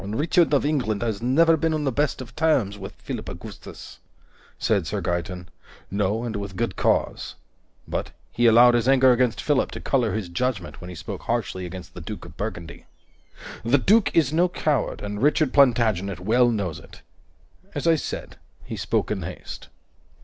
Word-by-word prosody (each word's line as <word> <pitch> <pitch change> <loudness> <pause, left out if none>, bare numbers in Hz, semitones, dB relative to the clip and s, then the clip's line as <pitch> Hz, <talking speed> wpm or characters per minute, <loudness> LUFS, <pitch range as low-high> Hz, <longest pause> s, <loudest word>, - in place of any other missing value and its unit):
"Richard 150 - +2
of 145 -1 +2
England 120 -8 0
has 110 -3 -2
never 160 +7 +4
been 160 0 0
on 155 - -2
the 135 - +1
best 145 +1 0
of 125 0 -11
terms 140 -11 +2
with 100 -1 -9
Philip - - -6
Augustus," - - -10 0.6
said - - +1
Sir - - -2
Gaeton. 90 +1 -3 0.5
"No, 100 +3 0
and 115 -2 -4
with 100 -1 -6
good 115 +4 -2
cause. - - 0 0.5
But - - -3 0.2
he 120 0 +3
allowed 120 +2 +7
his 120 0 +1
anger 130 -1 +6
against 125 -1 +1
Philip 145 -3 +2
to - - -6
color 120 -7 0
his 110 -3 -3
judgment 95 +1 -3
when 90 - -8
he 90 - -8
spoke 95 +4 -7
harshly 105 -6 -2
against 90 0 -9
the 90 - -8
Duke 100 +4 -7
of 85 -2 -13
Burgundy. 95 -4 -6 0.8
The 120 +5 +4
Duke 205 - +4
is 155 -3 +3
no 175 +3 +3
coward, 150 -8 -1
and 105 +1 -5
Richard 150 0 +2
Plantagenet 110 -9 +3
well 120 +6 +3
knows 100 -8 -2
it. - - -16 0.7
As - - -3
I 165 - +5
said, 160 - -4 0.3
he - - -6
spoke - - -1
in - - -2
haste." - - -8
115 Hz, 180 wpm, -24 LUFS, 100-140 Hz, 0.8 s, allowed